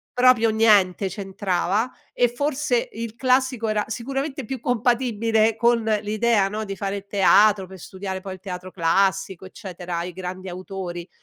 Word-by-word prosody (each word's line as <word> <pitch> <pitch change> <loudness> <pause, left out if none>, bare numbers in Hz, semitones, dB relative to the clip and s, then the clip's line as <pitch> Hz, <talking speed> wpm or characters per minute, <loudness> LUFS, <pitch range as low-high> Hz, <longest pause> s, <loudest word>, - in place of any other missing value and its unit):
proprio 245 -3 +5
niente 205 -4 +4
c'entrava 195 +3 -1 0.2
e 245 - +3
forse 275 0 -1
il 230 0 -6
classico 255 -2 +1
era 210 -1 +1
sicuramente 270 +3 -4
più 260 +1 -5
compatibile 230 -2 +1
con 235 0 +3 0.2
l'idea, 215 -1 +2
no, 215 +1 -4
di 195 0 -5
fare 200 0 -4
teatro 200 0 +4
pe 190 +1 -12
studiare 190 +1 -6
poi 190 -1 -6
il 185 - -11
teatro 185 -1 -7
classico, 190 +2 0
eccetera, 175 -2 -6
i 180 0 -6
grandi 185 0 -6
autori. 180 -1 -6
205 Hz, 145 wpm, -23 LUFS, 190-235 Hz, 0.2 s, proprio